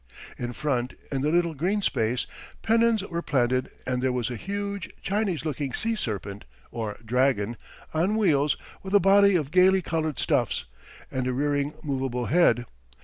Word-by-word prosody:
In 120 0 -4
front, 125 -3 -1 0.2
in 135 -2 -1
the 150 - +1
little 170 0 +2
green 190 +8 0
space, 115 -3 0 0.4
pennons 225 -2 +3
were 170 -1 -3
planted 130 -3 +1 0.2
and 125 -1 -1
there 130 0 +1
was 125 -1 -1
a - - -3
huge 200 - -4
Chinese 195 -6 -1
looking 145 -3 -2
sea 230 +1 0
serpent, 100 - -4 0.3
or 110 -3 -4
dragon, 120 -2 +1 0.4
on 175 +7 +1
wheels, 150 -9 +3 0.2
with 190 +1 -2
a - - +8
body 200 +1 +5
of 150 -5 0
gaily 185 +1 +5
coloured 160 -4 -1
stuffs, - - 0 0.5
and 130 -1 -1
a 130 - 0
rearing 145 +2 0
movable 130 -4 -2
head. 125 -7 +3
145 Hz, 160 wpm, -26 LUFS, 125-190 Hz, 0.5 s, a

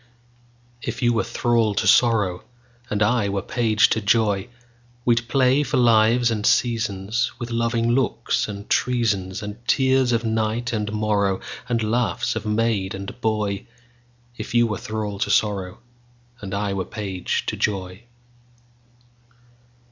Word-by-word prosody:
If - - -4
you 120 0 +3
were 115 - +1
thrall 115 -2 +1
to - - 0
sorrow, 105 -7 +3 0.5
And 105 0 +1
I 105 -1 +2
were 100 -1 -2
page 110 -3 +2
to 110 - 0
joy, 105 -1 +1 0.6
We'd 120 -1 +2
play 130 +2 +3
for 135 -1 -1
lives 115 0 +4
and 105 -2 -2
seasonsWith 115 +1 0
loving 115 0 0
looks 130 -1 0
and 100 -1 -7
treasonsAnd 105 -4 -1
tears 130 -2 +3
of 115 0 +1
night 110 +1 -1
and 105 -2 -1
morrowAnd 105 +2 -1
laughs 115 +2 0
of 110 -1 -4
maid 105 -3 0
and 100 +5 -8
boy; 105 -3 -1 0.7
If - - -6
you 120 0 +5
were 105 -3 -3
thrall 105 -2 -4
to - - -1
sorrow, 100 -4 0 0.6
And 100 -2 -5
I 100 0 -1
were 95 -2 -2
page 100 -5 -3
to - - -2
joy. 95 -1 -2
110 Hz, 135 wpm, -22 LUFS, 100-120 Hz, 0.7 s, you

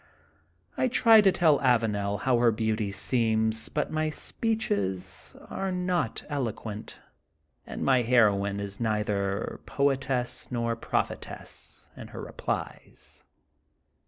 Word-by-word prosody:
I 260 - +2
try 230 -3 +6
to 195 -2 +5
tell 160 -5 +4
Avanel 105 -5 +1
how 125 -2 +2
her 120 -1 +5
beauty 110 -2 -1
seems, 110 +1 0
but 150 - -2
my 155 0 0
speeches 95 - -2
are 195 -1 -3
not 180 -10 -1
eloquent 115 -6 -4 0.7
and - - -5
my 130 -2 +4
heroine 100 -5 +3
is 100 -1 -5
neither 105 -2 -1
poetess 135 -3 0
nor 115 -2 -1
prophetess 115 - -4
in - - -9
her - - -8
replies. - - -6
115 Hz, 110 wpm, -28 LUFS, 105-140 Hz, 0.7 s, try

